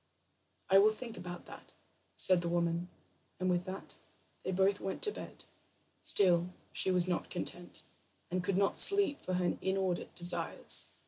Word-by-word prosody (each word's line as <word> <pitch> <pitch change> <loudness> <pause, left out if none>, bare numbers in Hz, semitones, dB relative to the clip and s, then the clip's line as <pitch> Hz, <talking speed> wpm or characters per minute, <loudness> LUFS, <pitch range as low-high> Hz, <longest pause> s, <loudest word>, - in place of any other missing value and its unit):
"I 195 - +6
will 215 +2 +4
think 230 0 -8
about 180 -2 -8
that," - - -14 0.4
said 185 -2 +6
the 170 - -3
woman, 170 0 -1 0.5
and 185 0 0
with 180 0 -1
that 190 +1 -9 0.4
they - - -4
both 195 +2 +1
went 195 - -5
to 420 - +1
bed. - - -10 0.6
Still 180 -2 +2 0.2
she - - -1
was 180 -1 +2
not 180 -2 -2
content, 175 0 -5 0.5
and 180 0 -2
could 190 0 -1
not 195 0 +1
sleep 395 -8 +6
for 185 - -3
her 180 -1 -1
inordinate 190 -2 -2
desires. 175 0 0
185 Hz, 155 wpm, -32 LUFS, 175-195 Hz, 0.6 s, I